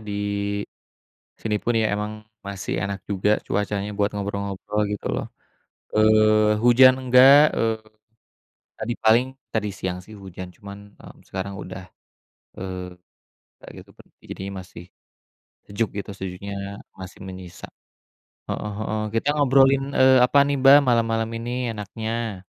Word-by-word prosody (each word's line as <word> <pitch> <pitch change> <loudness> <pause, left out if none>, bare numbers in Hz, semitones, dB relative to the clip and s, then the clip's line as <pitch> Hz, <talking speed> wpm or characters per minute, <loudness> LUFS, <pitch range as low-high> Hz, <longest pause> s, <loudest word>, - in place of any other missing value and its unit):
di 105 -1 -7 1.2
sini 105 -2 -2
pun 120 -1 0
ya 110 -2 +1
emang 105 +1 -4 0.2
masih 100 -2 -4
enak 100 -1 -4
juga 105 +1 +1
cuacanya 105 +1 -2
buat 100 0 0
ngobrol-ngobrol 100 +1 -3
gitu 105 -1 -5
loh, - - -2 0.7
eee, 110 0 +4
hujan 130 +2 +6
enggak, 130 +4 +6
eee, 110 -1 0 1.0
tadi 120 +2 -3
paling 115 +3 +5 0.3
tadi 105 -1 0
siang 90 -2 -5
sih 110 +3 -13
hujan, 95 -1 -9
cuman, 100 -1 -10 0.2
eee, - - -13 0.2
sekarang 95 +1 -4
udah, 95 0 -9 0.7
eee, 90 -1 -6 0.7
kayak - - -11 0.2
gitu - - -23
per - - -17
jadinya 100 +1 -7
masih 90 -1 -11 0.8
sejuk 105 +2 -1
gitu, 100 +1 -6
sejuknya 95 +1 -6 0.4
masih 95 -1 -10
menyisa. 95 -2 -9 0.8
Heeh 105 - -4
heeh, 110 0 -2 0.2
kita 135 - -7
ngobrolin, 135 -1 +3
eee, 130 -1 +5
apa 125 +3 +3
nih 145 - 0
Mbak 140 +2 +9
malam-malam 115 -2 +1
ini 120 0 -3
enaknya? 110 -1 -5
105 Hz, 130 wpm, -23 LUFS, 100-115 Hz, 1.2 s, Mbak